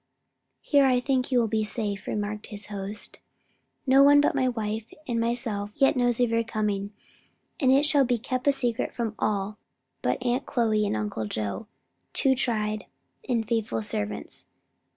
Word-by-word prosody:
"Here 285 -2 +4
I 255 -2 +4
think 260 0 0
you 255 - +3
will 235 -2 +3
be 220 0 0
safe," 210 -2 -3
remarked 210 0 -3
his 205 -2 -3
host. 200 +1 -6 0.7
"No 270 0 +6
one 285 +1 +7
but 290 - +3
my 260 -2 +2
wife 220 -1 -3 0.2
and 235 -2 0
myself 230 -3 -1
yet 270 -2 +4
knows 245 -2 +2
of 245 -2 +2
your 230 0 +2
coming, 210 -3 -2 0.7
and 260 -5 +4
it 275 +3 +5
shall 290 -2 +4
be 245 -1 +1
kept 255 +4 0
secret 245 -4 -2
from 230 -3 -2
all 205 0 -1 0.4
but - - +1
Aunt 245 +2 0
Chloe 220 -5 +1
and 110 - -1
Uncle 105 +1 -3
Joe, 105 - -3 0.5
two 270 -2 +4
tried 215 -5 -1 0.4
and 230 -3 0
faithful 220 - -1
servants. 105 0 -5
230 Hz, 165 wpm, -26 LUFS, 210-255 Hz, 0.7 s, one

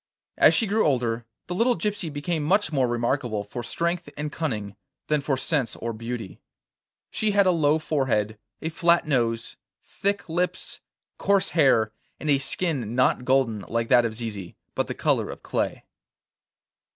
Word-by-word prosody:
As - - +6
she 230 - +2
grew 215 +2 +2
older, 120 -5 0 0.2
the 175 - -4
little 235 +6 +2
gypsy 205 -6 -2
became 150 +3 -2
much 195 +7 +2
more 135 -4 +2
remarkable 120 -2 -1
for 110 +4 -6
strength 170 +6 -1
and 150 0 -3
cunning 105 -12 -3 0.3
than 150 -1 +2
for 140 -1 0
sense 135 -5 0
or 115 0 -4
beauty. 115 -2 -6 0.7
She 215 - 0
had 200 -1 +5
a 185 - +5
low 155 -3 +3
forehead, 120 -9 0 0.2
a 160 - -1
flat 170 +1 +3
nose, 120 -5 0 0.3
thick 200 +1 -2
lips, 175 +2 -1 0.4
coarse 200 -1 +3
hair, 130 -9 +4 0.3
and 155 - 0
a 140 - +4
skin 140 - -2
not 125 0 +2
golden 130 -5 +2
like 115 0 -1
that 120 - +6
of 115 -2 -2
Zizi, 105 -6 -6 0.2
but - - -1
the - - -4
colour - - +1
of - - -9
clay. - - -2
140 Hz, 165 wpm, -25 LUFS, 115-170 Hz, 0.7 s, As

